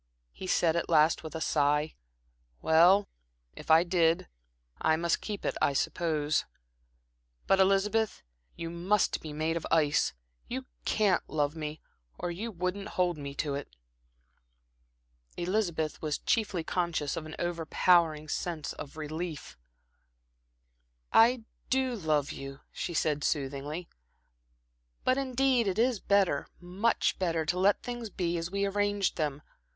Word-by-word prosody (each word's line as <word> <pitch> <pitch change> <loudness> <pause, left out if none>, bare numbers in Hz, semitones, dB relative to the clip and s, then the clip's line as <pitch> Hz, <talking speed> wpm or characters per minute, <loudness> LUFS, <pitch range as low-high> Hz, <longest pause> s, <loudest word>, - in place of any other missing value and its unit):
he 185 - -8
said 170 -2 +2
at 170 - -1
last 155 0 +4
with 160 0 -8
a - - -2
sigh. 150 0 +1 0.7
"Well, 175 +5 +5 0.5
if - - -11
I 160 +1 +7
did, 170 -2 +2 0.5
I 160 - +3
must 170 +1 0
keep 210 -2 -5
it, - - 0
I 140 - +3
suppose. 155 0 0 1.0
But, 195 - +3
Elizabeth, 200 +3 +2 0.3
you 165 0 -5
must 185 +4 +1
be 155 - -7
made 155 +2 -1
of 165 - -5
ice 150 -3 +2 0.3
you - - -4 0.2
can't 205 -3 +2
love 150 0 0
me, 155 -1 -5 0.4
or 175 - -3
you 210 +7 -4
wouldn't 185 +1 -3
hold 175 -3 +1
me 140 -1 -6
to 145 0 -2
it." 140 - -6 1.6
Elizabeth 175 -4 -1
was 150 -2 -1
chiefly 205 -7 0
conscious 170 -4 -1
of 155 -1 -5
an 155 - -8
overpowering 165 -2 +2
sense 160 -1 -3
of 145 +1 -9
relief. 155 +1 -5 1.6
"I 235 +1 +5 0.3
do 260 -1 +1
love 155 -7 0
you," 135 0 -8
she 175 - -4
said, 150 -2 +1
soothingly, 145 +3 -2 1.2
"but 255 +1 +2
indeed 260 -3 +2
it 190 - -1
is 235 -1 +2
better 195 -8 +2
much 185 +6 0
better 165 -3 0
to 175 +4 0
let 200 +2 +3
things 240 -2 -5
be 175 -3 -1
as 165 +1 -4
we 200 +1 0
arranged 205 -1 0
them. 150 -2 -2
170 Hz, 135 wpm, -30 LUFS, 155-195 Hz, 1.6 s, I